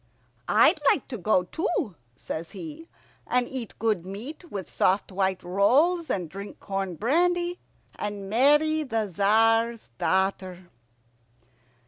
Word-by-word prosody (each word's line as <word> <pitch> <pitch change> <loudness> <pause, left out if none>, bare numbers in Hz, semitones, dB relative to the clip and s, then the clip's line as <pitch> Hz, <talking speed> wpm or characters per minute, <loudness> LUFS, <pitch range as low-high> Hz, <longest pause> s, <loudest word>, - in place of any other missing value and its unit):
"I'd - - +5
like - - +1
to 250 - -4
go 185 0 +2
too," 320 - -2 0.2
says 160 +1 -6
he, 325 0 -9 0.4
"and 250 -1 +1
eat 255 -5 -6
good 215 -6 0
meat, 245 - -8
with 195 -2 -5
soft 195 +2 +1
white 190 -1 -1
rolls, 270 - +2
and 180 -3 -1
drink 195 +5 -9
corn 195 -2 -3
brandy, 350 - +1 0.4
and 205 -1 -4
marry 295 +8 +4
the 225 -7 -1
Tzar's 225 - +2
daughter." 185 -2 -1
215 Hz, 120 wpm, -26 LUFS, 190-295 Hz, 0.4 s, I'd